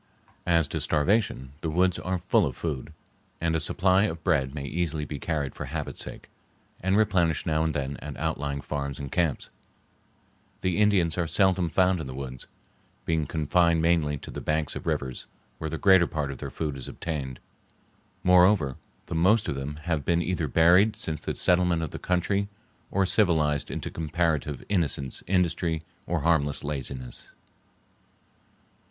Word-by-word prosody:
As 85 -3 +3
to - - -3
starvation, 85 - +1
the 80 - -2
woods 90 +3 +2
are 95 0 -1
full 90 +2 +2
of 65 - -6
food, 75 -2 -4 0.5
and 80 -1 0
a - - +2
supply 95 +5 +3
of 80 -5 -4
bread 70 -6 +1
may 70 -1 -4
easily 80 0 -2
be 75 -1 -6
carried 75 -5 -2
for - - -6
habit's - - -5
sake, - - -9 0.5
and 95 +2 +1
replenished 90 -7 +2
now 80 0 +1
and 80 -2 -1
then 70 0 -2
at 75 -2 -8
outlying 70 -3 -2
farms 70 -2 -4
and 70 -2 -6
camps. 85 -6 0 1.1
The 90 -2 0
Indians 95 -6 +3
are 85 - +1
seldom 95 -1 +2
found 90 +1 +2
in 70 - -6
the 65 - -7
woods, 65 -2 -7 0.6
being 80 -3 0
confined 80 +2 +2
mainly 80 -3 +2
to - - -9
the - - -6
banks 75 -1 -1
of - - -6
the - - +1
rivers, 65 -2 -3 0.3
where 80 - -3
the 80 - -3
greater 95 -2 +5
part 75 -3 -2
of 65 - -8
their - - -5
food 75 -4 -3
is 65 - -5
obtained. 70 -6 -5 0.8
Moreover, 90 -6 +5 0.3
the - - -6
most 95 +7 +3
of 75 - 0
them 70 +2 -4
have 80 -4 -1
been 85 +2 +2
either 85 -3 -1
buried 90 - +5
since 80 -2 -3
the - - -3
settlement 90 -2 +3
of 80 - -4
the - - -6
country 100 +3 0 0.4
or 95 0 +2
civilized 80 -8 +2
into - - -4
comparative 80 -3 -1
innocence, 75 -9 0
industry, 85 -3 +1 0.2
or 85 -2 0
harmless 75 -3 +1
laziness. 65 -4 -5
80 Hz, 170 wpm, -27 LUFS, 75-90 Hz, 1.1 s, greater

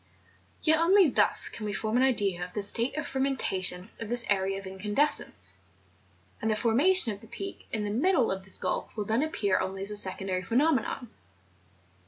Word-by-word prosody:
Yet 315 0 +4
only 360 +1 +5
thus - - +2
can 225 - -8
we 210 -1 -3
form 215 +1 -2
an 250 - +3
idea 205 -9 +2
of 180 0 -8
the 205 - -2
state 235 +7 0
of 310 - -2
fermentation 195 -8 -1
of 225 -2 -6
this 240 0 +1
era 195 -1 +1
of 195 - -8
incandescence; 205 +10 0 0.9
and 220 - -1
the 215 - +2
formation 255 - +3
of 200 -1 -8
the 225 - -14
Peak 390 - -8
in 215 -2 -1
the 205 - -3
middle 270 - +2
of 190 0 -3
this 190 - +4
gulf - - -3
will 210 -2 -3
then 225 +5 +1
appear 210 -11 0
only 190 +1 -4
a - - -3
secondary 190 -2 -1
pheno¬ 265 - +2
menon. 245 -1 -3
220 Hz, 190 wpm, -28 LUFS, 195-265 Hz, 0.9 s, only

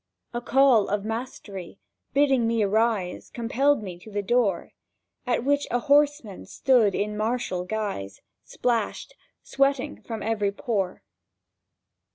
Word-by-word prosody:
—A 240 - -2
call 255 -4 +4
of 205 0 -1
mastery, 215 -5 -6 0.3
bidding 270 -4 +3
me 230 -1 +1
arise, 210 -2 0
Compelled 250 +2 +1
me 180 -3 -7
to 200 - -13
the 205 -1 -3
door, 215 -4 +1 0.6
At 245 -1 +1
which 285 +1 +1
a 245 - +1
horseman 285 -5 +1
stood 240 -8 +3
in 210 +1 -1
martial 215 -4 -1
guise— 185 - -4 0.2
Splashed—sweating 270 - -2
from 225 -2 -6
every 210 -2 0
pore. 200 -4 -2
225 Hz, 120 wpm, -25 LUFS, 205-255 Hz, 0.6 s, call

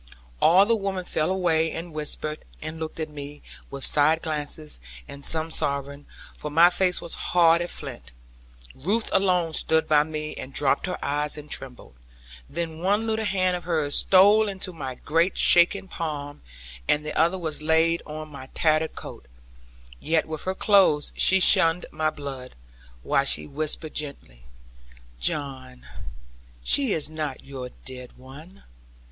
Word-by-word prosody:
All 185 +4 +6
the 230 +2 +2
women 195 -3 -4
fell 155 -1 -1
away, 165 -4 +1
and 165 0 -7
whispered, 155 0 -2 0.2
and 160 +1 -7
looked 160 0 -6
at 155 -1 -4
me, 145 0 -10 0.3
with 140 -1 -5
side 155 +2 +5
glances, 150 - -4 0.3
and 140 0 -11
some 160 +1 0
sobbing; 140 -1 -3 0.3
for 150 - -7
my 165 +4 +5
face 180 0 +1
was 170 - -4
hard 170 -1 +3
as 175 - -2
flint. 135 - -9 0.6
Ruth 205 +12 -2
alone 180 -4 +2
stood 160 +1 +1
by 150 -1 +4
me, 155 0 -5
and 130 - -8
dropped 145 +5 +1
her 180 - -3
eyes, 150 +1 -1
and 150 0 -11
trembled. 125 - -7 0.6
Then 160 0 -5
one 205 +5 0
little 220 0 -1
hand 185 -2 +1
of 175 -2 -7
hers 155 -4 -1
stole 205 +3 +5
into 190 -2 -5
my 135 -6 -6
great 165 +7 0
shaking 190 +3 +4
palm, 150 -5 -6 0.5
and 150 +1 +1
the 150 - -5
other 170 +4 +2
was 160 -4 -4
laid 160 +2 +2
on 155 0 -7
my 140 -3 -10
tattered 155 0 +1
coat: - - -10 0.7
yet 160 0 0
with 155 -1 -7
her 185 0 -2
clothes 190 -9 +3
she 190 - +6
shunned 165 -1 +4
my 155 0 -1
blood, 135 -4 -8 0.5
while - - +1
she 75 - +4
whispered 155 - -3
gently, - - -5 0.7
'John, 130 - -3 0.8
she 270 - +4
is 155 -5 +1
not 150 -4 -5
your 130 -2 -7 0.2
dead 125 -1 -6
one. 145 +9 -14
155 Hz, 155 wpm, -24 LUFS, 145-175 Hz, 0.8 s, All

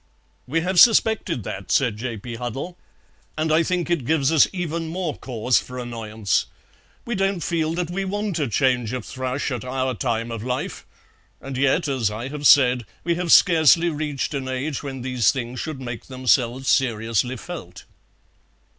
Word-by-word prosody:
"We 160 +5 0
have 180 +1 +1
suspected 220 - +4
that," 95 - -6
said 125 -6 +2
J. 120 0 -4
P. 120 +4 -8
Huddle, 125 +9 -5 0.6
"and 155 0 0
I 160 - +5
think 175 +1 -1
it 170 -6 0
gives 145 +1 +1
us 160 -5 +5
even 170 -2 -3
more 170 -1 -3
cause 125 -1 0
for 125 - -9
annoyance. 110 -4 -2 0.6
We 240 - -3
don't 195 -3 0
feel 165 -3 -1
that 175 -1 -2
we 195 +2 -2
want 205 -2 -2
a 145 - 0
change 125 -1 +1
of 125 -4 -4
thrush 130 +2 -3
at 125 - -3
our 130 0 -2
time 115 0 -2
of 115 -2 -5
life; 125 +1 -4 0.5
and 135 0 -7
yet, 140 +5 +2
as 130 -6 0
I 115 +5 -5
have 145 0 0
said, 125 -5 +5 0.2
we 170 - +1
have 170 -1 -2
scarcely 165 -1 +6
reached 150 -2 -3
an 135 -2 -3
age 130 +2 -3
when 135 -3 -6
these 125 -5 +2
things 125 -2 -5
should 155 -4 -5
make 120 -3 -7
themselves 130 0 +1
seriously 115 -1 +1
felt." 105 - -9
135 Hz, 175 wpm, -23 LUFS, 120-165 Hz, 0.6 s, scarcely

